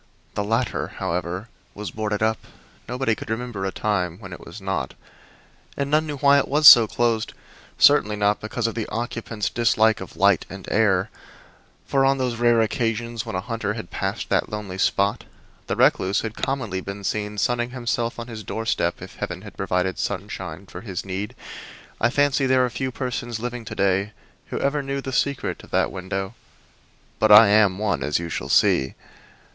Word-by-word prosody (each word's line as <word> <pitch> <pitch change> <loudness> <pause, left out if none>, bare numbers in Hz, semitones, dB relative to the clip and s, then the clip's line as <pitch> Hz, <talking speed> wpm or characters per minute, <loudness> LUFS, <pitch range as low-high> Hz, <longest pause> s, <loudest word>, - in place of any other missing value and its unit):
The 105 - -1
latter, 115 +4 -1
however, 90 +4 -3 0.3
was 105 0 -6
boarded 110 -1 -2
up 110 0 +1 0.5
nobody 125 -1 0
could 135 +2 -7
remember 110 -3 -3
a - - -2
time 90 -5 -1
when 95 -3 -10
it - - -10
was 85 - -10
not. 95 -9 -3 0.8
And 140 0 -2
none 155 +1 +3
knew 145 -1 -4
why 140 0 +5
it - - -1
was 150 +2 +5
so 115 -5 +11
closed; 115 -1 0 0.4
certainly 105 0 +5
not 105 0 +1
because 115 +2 -3
of 115 - 0
the 115 -2 -3
occupant's 115 -2 -3
dislike 110 -1 +2
of - - -9
light 100 -3 +4
and 95 -1 -9
air, 105 -2 +2 0.7
for 135 -1 +2
on 135 0 +3
those 125 -3 -1
rare 120 -1 +4
occasions 115 +1 -2
when - - -4
a 95 - -1
hunter 110 -1 -3
had 110 -6 -8
passed - - -3
that - - +1
lonely 100 -3 -6
spot 100 +4 +1 0.4
the - - -1
recluse 95 +2 +3
had 110 -1 -4
commonly 110 -9 -2
been 100 +1 -7
seen 105 +1 -2
sunning 120 +3 0
himself 120 -2 -2
on 115 - -5
his 110 -3 -8
doorstep 95 -5 -2
if 95 - -11
heaven 90 +2 -5
had 105 - -11
provided 95 -1 -1
sunshine 95 -3 -4
for 90 -1 -9
his 100 -5 -5
need. 95 +2 -4 0.6
I 115 - +3
fancy 140 0 +2
there 130 -1 +4
are 125 - -4
few 130 +2 -3
persons 120 -3 -4
living 120 0 -5
to - - -7
day 100 +2 +1 0.3
who - - -4
ever 140 +1 0
knew 140 0 -3
the 135 -1 -6
secret 140 +1 -1
of - - -14
that - - +1
window, 95 +2 -4 0.9
but 110 0 +3
I 105 0 +10
am 105 -3 +4
one, 105 -1 -1
as 75 - 0
you 85 0 -4
shall - - -4
see. 65 0 +3
110 Hz, 185 wpm, -23 LUFS, 95-120 Hz, 0.9 s, so